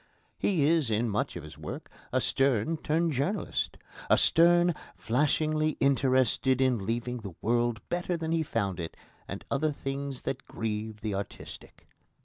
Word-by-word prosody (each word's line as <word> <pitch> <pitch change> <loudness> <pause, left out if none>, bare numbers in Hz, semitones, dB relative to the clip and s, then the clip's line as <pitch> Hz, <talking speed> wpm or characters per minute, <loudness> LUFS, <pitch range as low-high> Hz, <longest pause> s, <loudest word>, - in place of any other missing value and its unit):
He 170 -8 +2
is 155 -4 +3
in 110 +2 +1
much 105 - -1
of - - -6
his 75 0 -11
work - - -6 0.2
a - - +2
Sterne 135 +3 +1
turned 160 +2 +1
journalist 150 +10 -1 0.3
a - - +6
Sterne 175 +1 +5 0.2
flashingly 155 +4 +1
interested 130 -1 +3
in 125 -7 +2
leaving 120 +2 -1
the 100 -6 -8
world 120 0 0
better 175 0 -1
than 160 -1 -3
he 165 -1 +2
found 100 - -1
it 80 -1 -5 0.3
and - - -6
other 150 +2 +2
things 140 -1 -4
that 135 0 -4
grieve 110 -1 -4
the 110 -2 -2
artistic. 100 +1 -7
130 Hz, 150 wpm, -29 LUFS, 115-155 Hz, 0.3 s, a